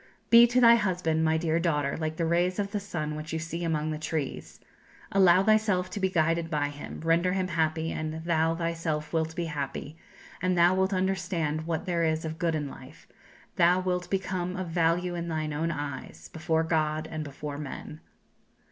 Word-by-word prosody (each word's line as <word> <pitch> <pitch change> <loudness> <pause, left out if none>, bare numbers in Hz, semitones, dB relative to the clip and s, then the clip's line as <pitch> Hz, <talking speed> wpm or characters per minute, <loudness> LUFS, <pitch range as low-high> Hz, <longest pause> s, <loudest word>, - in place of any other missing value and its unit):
"Be 235 +1 +9
to 245 +1 +2
thy 235 -1 +8
husband, 180 -6 0
my 160 0 +2
dear 160 0 0
daughter, 150 -5 0
like 155 -1 -3
the 165 - -1
rays 175 +2 +1
of 200 -1 -2
the 205 - -1
sun 170 -7 -4
which 155 +1 -6
you - - 0
see 170 +1 -4
among 155 -2 -1
the 155 - -4
trees; 155 -3 -4 0.5
allow 190 -1 +5
thyself 210 -4 +2
to - - -4
be 190 -1 +1
guided 165 -1 +1
by 145 -3 0
him, 145 +1 -8
render 170 +3 +2
him 185 -1 -1
happy 160 -1 0
and 155 +1 -4
thou 165 -1 +2
thyself 165 -2 -3
wilt 160 0 -1
be 175 - -2
happy, 145 -1 -5 0.5
and 185 0 +1
thou 175 +1 +5
wilt 190 +1 +1
understand 180 -5 -1
what 165 -2 -2
there 170 -2 0
is 160 0 0
of 160 0 -5
good 170 -2 +1
in 150 -2 -2
life; 130 -1 -12 0.5
thou 175 +2 +5
wilt 180 -1 -2
become 185 -2 -2
of 185 -2 -4
value 170 +1 +1
in 170 -1 -4
thine 155 -2 -2
own 160 +3 -1
eyes, 145 -4 -6
before 160 0 0
God, 155 -1 0
and 155 -1 -3
before 145 0 -6
men." 150 +1 -7
165 Hz, 190 wpm, -28 LUFS, 155-180 Hz, 0.5 s, Be